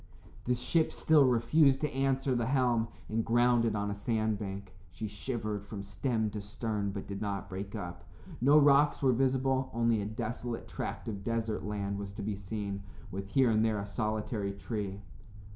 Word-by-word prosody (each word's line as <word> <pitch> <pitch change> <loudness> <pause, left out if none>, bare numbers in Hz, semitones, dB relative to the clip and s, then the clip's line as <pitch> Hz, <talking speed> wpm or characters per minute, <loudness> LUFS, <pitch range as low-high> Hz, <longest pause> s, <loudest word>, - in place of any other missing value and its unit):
The 125 - +2
ship 155 +6 +1
still 155 -3 +5
refused 130 +3 +4
to 150 - 0
answer 135 0 +1
the 120 -2 0
helm 125 -4 +2 0.2
and 110 +1 0
grounded 120 -1 +3
on 105 0 -1
a - - -1
sandbank. 100 -3 -2 0.2
She 110 +6 -5
shivered 105 -1 -3
from 100 -1 -7
stem 110 +2 -1
to 105 - -4
stern 105 0 -2
but 100 0 -5
did 100 -1 -6
not 100 -1 -2
break 100 +1 -6
up. 85 0 -6 0.4
No 140 +4 +6
rocks 145 0 +5
were 130 -2 +5
visible, 130 +1 +1
only 115 -2 +2
a 100 - -3
desolate 115 +2 -4
tract - - -5
of 100 -3 -4
desert 115 0 -1
land 100 -1 -2
was 100 -1 -6
to 105 0 -6
be 105 0 -2
seen, 100 0 -4 0.3
with 100 +1 -5
here 130 0 +4
and 110 0 +3
there 110 -1 +2
a 100 - -3
solitary 105 -1 -2
tree. 100 -1 -4
110 Hz, 175 wpm, -31 LUFS, 100-125 Hz, 0.4 s, No